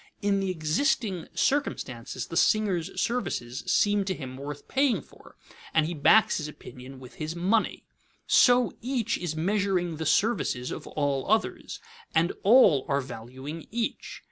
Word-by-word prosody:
In 200 -1 +2
the 195 -1 -1
existing 185 - 0
circumstances, 130 - -1
the 165 - -8
singer's 195 -4 +1
services 175 - -2
seem 205 -1 +3
to 190 -1 -2
him 130 -5 -7
worth 140 +2 -8
paying 270 -2 +2
for, - - -18 0.4
and 160 -1 +4
he 170 - -3
backs 215 +8 +4
his 150 - -4
opinion 130 -3 -11
with 125 -2 -12
his 155 +2 -3
money. 195 +6 0 0.4
So 245 -1 +5
each 245 -2 -1
is 175 -3 -3
measuring 180 -1 0
the 160 -1 -3
services 160 - +1
of - - -7
all 140 -1 -2
others, 220 +1 -1 0.4
and 165 +2 +2
all 195 - +6
are 140 0 +1
valuing 130 +5 -8
each. 240 - -4
175 Hz, 145 wpm, -27 LUFS, 145-215 Hz, 0.4 s, all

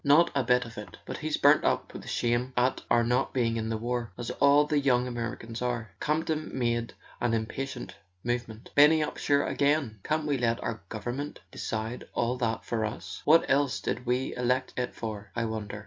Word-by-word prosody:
"Not 150 +4 +5
a 140 -2 +1
bit 125 +1 +3
of 115 -2 -8
it... 100 -4 -10
But - - -5
he's - - -1
burnt - - +5
up - - 0
with - - -8
shame 120 +2 0
at 125 +1 +2
our 120 0 +4
not 125 +3 0
being 115 -3 +2
in 110 -1 -2
the 110 - -1
war—as 120 0 -3
all 140 +3 +5
the 150 0 +1
young 125 -3 +3
Americans 115 -1 -5
are." 120 -2 -2
Campton 155 0 -1
made 120 -2 0 0.2
an 120 -1 +1
impatient 125 +3 -4 0.3
movement. 120 -2 -3
"Benny 150 +2 +7
Upsher 145 -1 +1
again! 140 -7 +1
Can't 155 0 0
we 145 -3 0
let 115 -1 +1
our 115 -3 -3
government 120 +6 -4
de¬ - - -10
cide 110 +2 -3
all 120 +1 +1
that 115 -2 -1
for 115 -2 -1
us? 95 -4 -5
What 165 +2 +6
else 140 -1 +2
did 125 - -3
we 125 +2 0
elect 125 +1 0
it 125 -1 -2
for, 110 -2 -5
I 115 -1 0
wonder?" 110 -2 -4
120 Hz, 195 wpm, -29 LUFS, 115-140 Hz, 0.3 s, Benny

